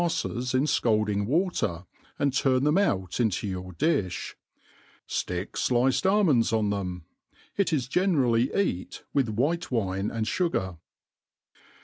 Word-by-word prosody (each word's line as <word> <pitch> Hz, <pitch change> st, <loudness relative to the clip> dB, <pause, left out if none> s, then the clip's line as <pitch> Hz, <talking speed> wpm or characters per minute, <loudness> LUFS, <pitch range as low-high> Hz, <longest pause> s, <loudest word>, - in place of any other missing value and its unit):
fTes 125 Hz, -7 st, -2 dB
in 130 Hz, -, +3 dB
fcaldjng 105 Hz, -7 st, +1 dB
water, 120 Hz, -, 0 dB, 0.3 s
and 140 Hz, -2 st, +1 dB
turn 130 Hz, -1 st, +2 dB
them 150 Hz, +2 st, +3 dB
out 95 Hz, -, 0 dB
into 110 Hz, -6 st, +1 dB
your 95 Hz, -2 st, -5 dB
diih;, 95 Hz, -, -1 dB, 0.7 s
Aick 90 Hz, +2 st, -3 dB, 0.2 s
Hiced 130 Hz, +7 st, +2 dB
almonds 165 Hz, -, +3 dB
on 110 Hz, -2 st, +1 dB
them. 90 Hz, -4 st, -4 dB, 0.5 s
It 200 Hz, -2 st, +1 dB
is 135 Hz, -6 st, 0 dB
generally 135 Hz, -8 st, +2 dB
eat 140 Hz, -, -2 dB
with 135 Hz, -5 st, +2 dB
white* 150 Hz, +11 st, -1 dB
wine 100 Hz, -4 st, -1 dB
and 110 Hz, -1 st, -2 dB
fugar. 100 Hz, -, -1 dB
120 Hz, 125 wpm, -27 LUFS, 100-150 Hz, 0.7 s, in